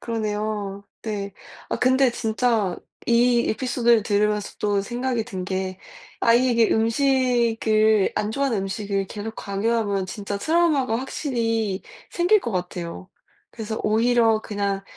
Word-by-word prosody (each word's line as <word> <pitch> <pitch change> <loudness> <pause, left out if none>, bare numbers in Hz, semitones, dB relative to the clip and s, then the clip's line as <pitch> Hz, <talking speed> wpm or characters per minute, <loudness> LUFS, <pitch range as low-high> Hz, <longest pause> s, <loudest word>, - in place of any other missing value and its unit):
그러네요. 210 -3 -3 0.2
네. 200 -3 -4 0.4
아 - - -1
근데 260 0 +3
진짜 220 -5 0 0.3
이 240 0 +3
에피소드를 240 -2 +2
들으면서 210 0 0
또 205 -1 +1
생각이 240 +2 -2
든 190 -6 -5
게 185 0 -3 0.4
아이에게 235 -1 +4
음식을 225 -3 +2
안 210 0 -1
좋아하는 270 -2 0
음식을 195 0 -2
계속 215 +1 -6
강요하면 200 -1 -1
진짜 200 +1 -5
트라우마가 305 -4 +2
확실히 230 -7 -2 0.3
생길 360 +5 +3
것 235 - -4
같아요. 180 0 -5 0.4
그래서 220 -1 -5
오히려 225 0 +3
그냥 200 -2 -2
220 Hz, 285 characters per minute, -23 LUFS, 200-240 Hz, 0.4 s, 아이에게